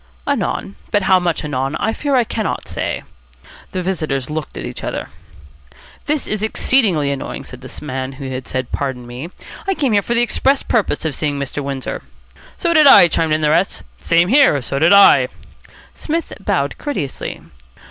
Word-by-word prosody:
"Anon. 100 - -2
But 205 -2 +1
how 190 -1 +5
much 175 -3 -1
anon 135 0 -2
I 220 - -1
fear 285 +2 -1
I 250 - +4
cannot 220 -2 -3
say." - - -3 0.7
The 185 - -3
visitors 155 -7 -2
looked 155 0 -5
at - - -5
each - - -7
other. - - -4 1.0
"This 300 -1 0
is 215 -1 -3
exceedingly 210 - +2
annoying," 140 - -5
said 130 0 -11
the 130 +3 -9
man 130 -1 -4
who 135 0 -7
had 130 0 -5
said 130 -1 -3
"Pardon 130 -3 -3
me!" 125 +7 -7 0.4
"I 390 - +1
came 250 -10 +2
for 235 - -2
the 235 - +4
express 270 +3 +2
purpose 200 -9 0
of 155 - -1
seeing 145 0 -2
Mr. 140 +1 -4
Windsor." 135 -1 -4 0.6
"So 340 -2 +1
did 310 -3 +6
I," 180 -10 +9
chimed 160 -1 +1
in 155 - +1
the 150 - +2
rest. 180 +5 +1 0.2
"Same 170 +1 +2
here. 265 - +5
So 135 +2 -2
did 160 +3 +4
I." 200 0 +7 0.7
Psmith 330 +2 -3
bowed - - -1
courteously. 190 - -4
165 Hz, 180 wpm, -18 LUFS, 140-225 Hz, 1.0 s, I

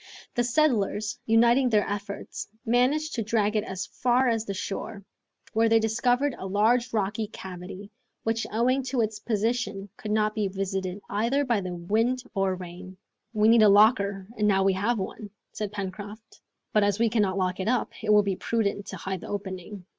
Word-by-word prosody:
The 240 - +1
settlers, 235 -6 +1
uniting 235 +3 +4
their 210 -3 +2
efforts, 205 0 -5 0.2
managed 260 +7 +2
to 235 - -1
drag 215 -1 +1
it 210 - +2
as 190 -3 -4
far 250 +1 +1
as 225 -1 0
the 200 - -3
shore, 200 +1 -5 0.5
where 225 +1 +3
they 225 - +5
discovered 245 +5 +1
a 190 - -5
large 230 +5 +2
rocky 215 0 -1
cavity, 190 +1 -9 0.3
which 225 0 -1
owing 250 +5 +2
to 255 -2 0
its 215 -1 -2
position 215 -2 -1
could 215 - -7
not 215 0 +1
be 215 -2 0
visited 190 0 -3
either 235 +8 0
by 235 -5 +1
the 180 -1 -5
wind 225 +8 0
or 195 -1 +1
rain. 185 +1 -9 0.3
"We 215 -2 +3
needed 225 -1 +7
a - - +7
locker, 200 -2 +4
and 210 0 +1
now 195 -2 +3
we 195 0 +3
have 215 +5 0
one," 205 +2 -5 0.2
said 210 -2 -4
Pencroft; 205 +2 -7 0.3
"but 215 - +4
as 205 -1 +2
we 230 +1 +3
cannot 210 -4 +1
lock 185 -1 -1
it 190 - -2
up, 245 0 +1
it 215 - +2
will 210 0 +6
be 195 -1 -1
prudent 205 -1 -1
to 190 - -6
hide 190 +1 -4
the - - -8
opening. 190 -1 -6
210 Hz, 185 wpm, -26 LUFS, 195-230 Hz, 0.5 s, needed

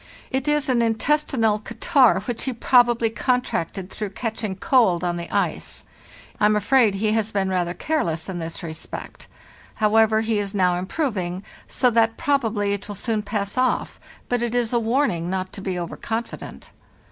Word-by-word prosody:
It 265 +2 -1
is 295 0 +1
an 250 -3 +2
intestinal 230 -1 +1
catarrh, 255 +3 +3
which 245 -3 -4
he 260 - -1
probably 240 -1 +3
contracted 215 - -1
through 210 -2 -4
catching 220 -4 -3
cold 190 -5 +3
on 175 -1 0
the 170 0 -6
ice. - - -1 0.5
I - - +4
am 210 - +3
afraid 215 0 +3
he 210 +2 0
has 220 0 0
been 195 -2 0
rather 180 -1 -1
careless 170 - -1
in 185 -2 -4
this 165 +2 -5
respect. 160 -1 -7 0.5
However, 220 0 +3
he 220 -1 0
is 200 0 -3
now 180 -2 +3
improving, 185 - -2 0.2
so 250 -2 +2
that 225 0 +2
probably 225 -8 +1
it 200 0 -5
will 205 - -6
soon 220 +1 -1
pass 205 +2 -3
off; 255 - 0 0.3
but 245 -1 0
it 240 0 -1
is 240 -1 0
a 240 - +3
warning 225 - 0
not 185 0 -3
to 200 - -7
be 190 -2 -3
over 175 -1 -4
confident. 230 +1 -5
220 Hz, 170 wpm, -23 LUFS, 190-245 Hz, 0.5 s, I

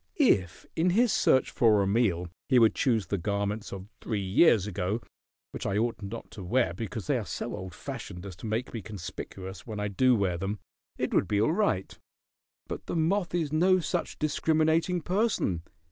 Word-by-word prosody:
If 95 - +2
in 170 +3 +2
his 230 +5 +3
search 130 - +3
for 105 -4 +4
a - - 0
meal 95 -4 +1 0.2
he 130 - +5
would 115 -2 +6
choose 115 -7 +1
the 100 +2 -2
garments 100 +3 -2
of 95 0 -7
three 110 -3 -2
years 100 - +4
ago, 100 +1 -2 0.5
which - - -4
I 100 - 0
ought 115 +1 0
not 110 +3 -7
to 100 - -8
wear 95 -1 +1
because 110 +1 -5
they - - +1
are - - -4
so - - -4
old 95 -2 -7
fashioned 90 +2 -7
as 95 -3 -7
to 110 - -7
make 110 +4 -2
me 115 - -4
conspicuous 95 -1 -8
when 110 -2 -5
I 105 0 -1
do 125 +6 +4
wear 95 -5 0
them, 95 +3 -2 0.4
it - - -2
would - - +3
be 105 - +1
all 115 +9 +3
right. 180 - 0 0.7
But - - -7
the - - -3
moth 175 +2 +1
is 155 -4 -1
no 185 +4 +4
such 175 0 -2
discriminating 160 +3 +1
person. 180 - 0
110 Hz, 190 wpm, -28 LUFS, 95-155 Hz, 0.7 s, would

